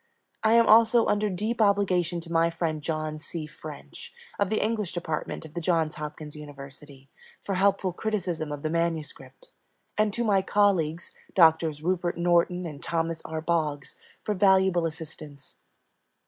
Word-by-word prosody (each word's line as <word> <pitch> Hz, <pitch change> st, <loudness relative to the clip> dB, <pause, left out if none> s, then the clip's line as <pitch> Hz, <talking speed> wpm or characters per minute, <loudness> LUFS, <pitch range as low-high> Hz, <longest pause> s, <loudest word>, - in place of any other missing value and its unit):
I 220 Hz, 0 st, +4 dB
am 230 Hz, 0 st, +6 dB
also 230 Hz, +1 st, +6 dB
under 210 Hz, 0 st, +1 dB
deep 215 Hz, +5 st, -2 dB
obligation 185 Hz, -4 st, +2 dB
to 165 Hz, 0 st, -11 dB
my 165 Hz, 0 st, +3 dB
friend 165 Hz, -2 st, -2 dB
John 155 Hz, 0 st, -3 dB
C. 160 Hz, 0 st, -6 dB
French, 155 Hz, -, -10 dB, 0.3 s
of 200 Hz, -, +2 dB
the 215 Hz, -, +1 dB
English 215 Hz, -4 st, -1 dB
Department 160 Hz, -2 st, -4 dB
of 155 Hz, -, -12 dB
the 170 Hz, -, -4 dB
Johns 165 Hz, -2 st, +1 dB
Hopkins 150 Hz, 0 st, -7 dB
University, 140 Hz, -1 st, -11 dB, 0.4 s
for 200 Hz, -, -2 dB
helpful 195 Hz, -1 st, +2 dB
criticism 180 Hz, -7 st, -2 dB
of 145 Hz, -1 st, -6 dB
the 155 Hz, -, 0 dB
manuscript, 170 Hz, -, -3 dB, 0.5 s
and 215 Hz, -1 st, +3 dB
to 235 Hz, +4 st, -2 dB
my 200 Hz, -4 st, +3 dB
colleagues, 185 Hz, -5 st, +1 dB, 0.2 s
Doctors 160 Hz, -3 st, +4 dB
Rupert 175 Hz, 0 st, 0 dB
Norton 175 Hz, +1 st, +2 dB
and 150 Hz, -4 st, -7 dB
Thomas 165 Hz, -1 st, -2 dB
R. 160 Hz, 0 st, -4 dB
Boggs, 155 Hz, -4 st, -1 dB, 0.3 s
for 210 Hz, -, -1 dB
valuable 190 Hz, -3 st, +3 dB
assistance. 155 Hz, -3 st, -10 dB
170 Hz, 150 wpm, -27 LUFS, 155-195 Hz, 0.5 s, am